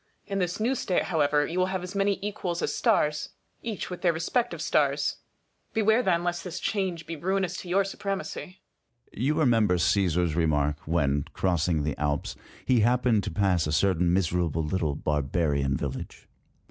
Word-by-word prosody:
In 195 0 -2
this 180 +2 -1
new 235 +5 +1
state, 190 -8 0
however, 150 -3 +2
you 175 +4 -3
will 185 - +3
have 190 -1 -3
as 180 +1 -6
many 200 0 +1
equals 180 -4 -3
as - - -1
stars, 150 0 +1 0.3
each 220 -5 -5
with 180 - -6
their 175 - +4
respective 200 +10 -1
stars. - - +1 0.6
Beware 220 +2 +4
then 175 -6 +1
lest 175 0 -2
this 180 0 -5
change 185 -6 -2
be 165 - -5
ruinous 185 +2 -1
to 180 - -8
your 195 +3 +3
supremacy. 195 -1 -5 0.5
Sun. - - -7
You 150 +3 +2
remember 115 - +3
Csesar's 90 -2 +2
remark, 75 -3 +1
when, 75 -3 +1
crossing 85 -4 +1
the 75 -1 -1
Alps, 75 -1 -1 0.3
he 125 -2 +3
happened 120 -1 +3
to - - -2
pass 95 -6 +1
a - - -1
certain 90 +1 +2
miserable 85 -3 +1
little 75 -2 -1
barbarian 70 -1 0
village. - - -6
130 Hz, 170 wpm, -27 LUFS, -, 0.6 s, their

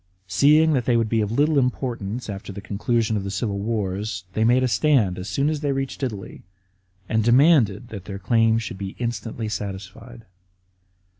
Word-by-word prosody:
Seeing 150 - +4
that 125 -4 0
they 120 -2 +3
would 115 -2 0
be 115 -1 +1
of 105 0 -2
little 145 +4 +3
importance 125 -3 -2
after 100 -1 -6
the 100 - -7
conclusion 110 +3 -1
of 100 - -3
the 100 - -4
civil 100 +1 -2
wars, 100 -2 -3
they 110 - +1
made 125 +3 +4
a - - +3
stand 120 - +2
as 95 +2 -6
soon 140 +8 0
as 155 -1 0
they 145 -1 -1
reached 135 0 -3
Italy, 110 -8 -5 0.7
and 110 0 +1
demanded 125 - +4
that 100 -5 -8
their 100 - -6
claims 115 +2 +2
should 95 -2 -7
be 95 -1 -6
instantly 115 -1 -4
satisfied. 105 +3 -7
115 Hz, 180 wpm, -23 LUFS, 100-125 Hz, 0.7 s, Seeing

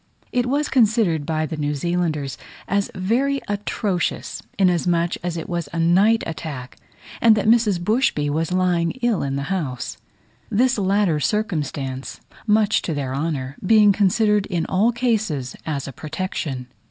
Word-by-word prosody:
It 245 -1 +1
was 290 +3 +1
considered 215 - +2
by 155 -1 0
the 160 0 -5
New 145 0 -1
Zealanders 155 -3 -1 0.3
as 200 +1 0
very 250 +9 +1
atrocious, 205 -2 -2 0.2
inasmuch 175 -2 +2
as 175 -1 -2
it 165 - -5
was 170 -4 -3
a 170 - -5
night 195 +7 +4
attack, 145 -6 -6 0.4
and 225 -2 +6
that 210 - -1
Mrs. 220 -4 +4
Bushby 195 - +1
was 160 +3 -1
lying 180 -2 +1
ill 235 -5 +2
in 135 -1 -2
the 140 +7 -2
house: 135 -9 -4 0.5
this 245 +2 +2
latter 195 -4 +2
circumstance, 145 -10 -2 0.3
much 215 0 +3
to 165 - -3
their 135 -2 -3
honour, 140 -2 -3
being 210 +1 +6
considered 210 +1 +2
in 175 -4 -1
all 210 +6 +2
cases 215 - -1
as 140 -3 -2
a 135 - -7
protection. 155 -4 -4
180 Hz, 150 wpm, -22 LUFS, 150-210 Hz, 0.5 s, and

